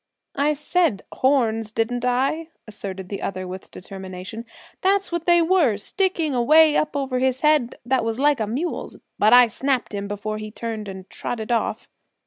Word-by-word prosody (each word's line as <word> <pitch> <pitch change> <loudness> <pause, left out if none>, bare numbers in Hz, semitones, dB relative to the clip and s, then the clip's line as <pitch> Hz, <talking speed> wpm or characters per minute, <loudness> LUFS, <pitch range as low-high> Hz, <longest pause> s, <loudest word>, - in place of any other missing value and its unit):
"I 290 +2 +1
said 300 - 0
horns, 230 -5 +1
didn't 230 +2 -1
I?" 270 +6 0 0.2
asserted 195 -3 -7
the 200 - -5
other 185 -1 -4
with 185 +1 -8
determination. 190 +4 -8 0.3
"That's 390 0 +2
what 340 0 -3
they 345 -1 +5
were, 325 - +3
sticking 335 - -1
away 300 +5 +5
up 305 -1 0
over 265 -3 -1
his 260 0 0
head 300 -5 +3
that 255 0 +1
was 225 0 -2
like 290 0 +3
a 215 - -1
mule's. 280 +11 -3 0.2
But 215 - +5
I 245 0 +9
snapped 260 +1 -1
him 200 0 -3
before 210 +1 -4
he 215 0 -6
turned 220 -1 -5
and 190 -1 -8
trotted 225 -1 -4
off!" 235 - -1
245 Hz, 170 wpm, -23 LUFS, 215-295 Hz, 0.3 s, I